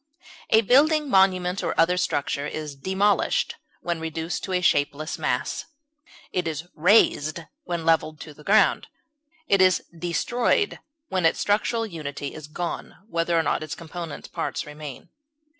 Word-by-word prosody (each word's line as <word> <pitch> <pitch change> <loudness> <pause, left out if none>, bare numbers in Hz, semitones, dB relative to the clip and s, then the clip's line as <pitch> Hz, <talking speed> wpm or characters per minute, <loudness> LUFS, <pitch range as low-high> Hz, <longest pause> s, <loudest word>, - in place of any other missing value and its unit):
A 220 - +6
building, 290 +5 +4
monument, 185 -1 +3
or - - -2
other 170 +2 +4
structure 145 -5 -1
is 150 -2 -5
demolished 190 +7 +1 0.2
when 170 -1 -2
reduced 160 +1 -4
to 190 - -6
a 180 - +3
shapeless 150 -3 +1
mass; - - -1 0.7
it 180 -2 -1
is 160 +2 -4
razed 170 -3 +3 0.2
when 170 -6 -3
leveled 160 -1 +1
with 150 -2 -13
the 150 - -14
ground; 215 +5 +3 0.6
it 195 -1 +4
is 185 -1 +4
destroyed 235 - 0 0.3
when 185 -2 0
its 165 - +3
structural 220 +3 +1
unity 145 -7 -6
is 155 -2 -9
gone, 170 +3 -5
whether 170 -1 +1
or 165 - +3
not 145 - 0
its 155 - -5
component 170 -1 -8
parts - - -3
remain. 150 -3 -9
170 Hz, 145 wpm, -25 LUFS, 155-190 Hz, 0.7 s, A